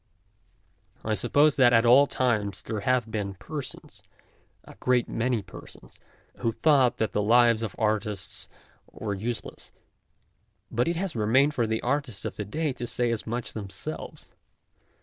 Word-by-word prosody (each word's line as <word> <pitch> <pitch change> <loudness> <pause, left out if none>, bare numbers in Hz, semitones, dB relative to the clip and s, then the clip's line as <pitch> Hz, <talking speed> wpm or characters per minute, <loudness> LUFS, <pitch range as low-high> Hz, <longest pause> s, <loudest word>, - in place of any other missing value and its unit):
I 110 - 0
suppose 145 +9 +3
that 125 -2 +6
at 115 0 +5
all 130 +4 +7
times 110 -8 -1
there 110 -2 -4
have 120 +1 0
been 100 -3 -3
persons, 145 - -8 0.6
a - - -13
great 125 -1 +2
many 120 -2 -1
persons, - - -13 0.4
who 115 - -1
thought 135 -2 +3
that 110 - -1
the 105 - 0
lives 115 +1 +4
of 110 -4 -4
artists 105 -2 -1 0.4
were 105 -2 -4
useless, 115 +4 -5 1.0
but 120 +5 +1
it 170 - 0
has 180 -3 -3
remained 125 +7 +3
for 120 -6 0
the 110 0 -1
artists 130 -5 -1
of - - -4
to 105 - -3
day 155 +8 -2
to 125 -1 -5
say 120 0 0
as 115 - -3
much 120 +1 -4
them 100 -3 -6
selves. 95 - -7
115 Hz, 155 wpm, -27 LUFS, 110-130 Hz, 1.0 s, all